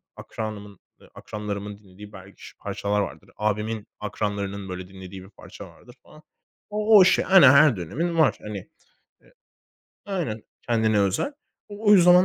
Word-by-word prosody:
akranımın, 105 -3 -7 0.2
eee - - -18
akranlarımın 105 -1 -6
dinlediği 105 0 -14
belki 95 +1 -13
ş - - -15
parçalar 105 0 -2
vardır. 100 - -7
Abimin 105 0 -2
akranlarının 100 -2 -4
böyle 90 0 -6
dinlediği 95 0 -11
bir 95 - -15
parça - - -12
vardır 125 - -18
falan. 155 0 -18 0.5
O 210 +1 +4
o 195 - +9
işte, 185 - +3
aynen 185 -9 +8
her 140 -2 +6
dönemin 165 - -3
var. 160 -3 +3
Hani, 105 -1 -6 0.7
eee - - -25 0.7
aynen 165 - -3 0.2
kendine 110 -3 +1
özel. 100 - 0 0.4
O 205 +1 -4
o - - +9
yüzden 180 -1 +7
105 Hz, 150 wpm, -24 LUFS, 100-155 Hz, 0.7 s, o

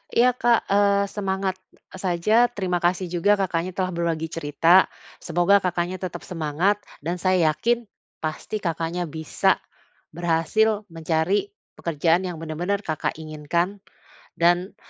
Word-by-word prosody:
Iya 245 +2 +5
Kak, 240 -3 +1
eee, 200 0 +4
semangat, 190 -2 -2 0.2
eee, 190 - -14
saja, 195 +6 +3
terima 190 -7 -2
kasih 175 0 0
juga 180 +4 +3
Kakaknya 185 -2 -2
telah 185 -1 -1
berbagi 165 -2 -2
cerita. 165 +3 +4 0.3
Semoga 175 +4 +3
Kakaknya 180 0 -2
tetap 185 -1 -6
semangat 175 +4 0 0.2
dan 175 +3 -2
saya 180 -4 +3
yakin 235 +9 0 0.4
pasti 180 +7 -4
Kakaknya 170 0 -2
bisa 160 -1 0 0.6
berhasil 175 +6 +1
mencari 165 - 0 0.2
pekerjaan 165 +2 +1
yang 175 -3 -5
benar-benar 170 +5 -2
Kakak 155 0 -2
inginkan 165 +6 -2 0.5
dan, 175 +3 +2
175 Hz, 125 wpm, -24 LUFS, 165-200 Hz, 0.6 s, Iya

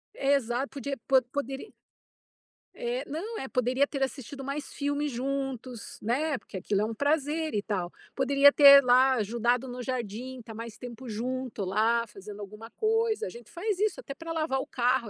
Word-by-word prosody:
Exato, 270 -2 +1
podia 275 0 -4
po 265 -1 +6
poderia 275 - -3 1.1
eh, 245 +3 -2
não, 405 +10 -4
é 265 - -4
poderia 255 +2 +2
ter 275 -1 -5
assistido 270 +1 -5
mais 280 +2 -4
filme 285 +1 -1
juntos, 265 -2 -4
né, 275 +6 0
porque 195 - -9
aquilo 200 +2 0
é - - +2
um 225 - -3
prazer, 300 +4 0
e 205 - +1
tal. 185 -5 -2 0.2
Poderia 275 +1 +6
ter 280 -1 +9
lá 255 +2 +5
ajudado 240 +2 +1
no 250 0 -6
jardim, 250 +1 -4
tá 225 - -9
mais 230 0 -7
tempo 245 +1 -9
junto 245 0 -3
lá, 225 +5 +2
fazendo 205 0 -10
alguma 210 +3 -9
coisa. 450 0 +1
A - - -5
gente 235 +3 -12
faz 385 +3 -2
isso 425 -2 +1
até 275 - -7
pra 330 +2 -7
lavar 310 -5 0
o - - -4
carro 245 -2 +1
260 Hz, 175 wpm, -28 LUFS, 230-280 Hz, 1.1 s, ter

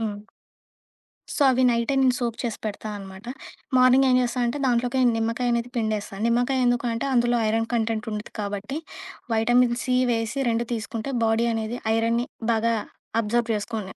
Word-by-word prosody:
హ్మ్. 210 -2 -3 1.2
సో, - - -2
అవి 255 0 +2
నైటే 235 +3 +1
నేను 255 -2 +3
సోక్ 235 -2 -2
చేసి 230 -2 -3
పెడతా 215 +1 -4
అన్నమాట. 195 0 -10 0.5
మార్నింగ్ 255 +1 +5
ఏం 250 - +4
జేస్తా 245 +1 -1
అంటే 265 +5 -2
దాంట్లోకె 245 +2 +1 0.2
నిమ్మకాయ 230 +2 0
అనేది 235 +1 -2
పిండేస్తాను. 215 -2 -2
నిమ్మకాయ 245 +2 +1
ఎందుకు 245 0 +1
అంటే 230 +4 -2
అందులో 240 -1 +3
ఐరన్ 225 +1 0
కంటెంట్ 225 0 -1
ఉండుద్ది 210 0 -6
కాబట్టి 205 +7 -4 0.6
వైటమిన్ 240 +2 +3
సి 255 -1 +1 0.2
వేసి 225 +3 -1
2 230 +1 0
తీస్కుంటే 225 +2 -4
బాడీ 225 +1 +2
అనేది 225 +2 -3 0.2
ఐరన్‌ని 230 +2 +1 0.3
బాగా 230 +1 +1 0.5
అబ్జార్బ్ 230 +2 0
చేసుకుని 210 -2 -5
235 Hz, 155 wpm, -24 LUFS, 220-245 Hz, 1.2 s, మార్నింగ్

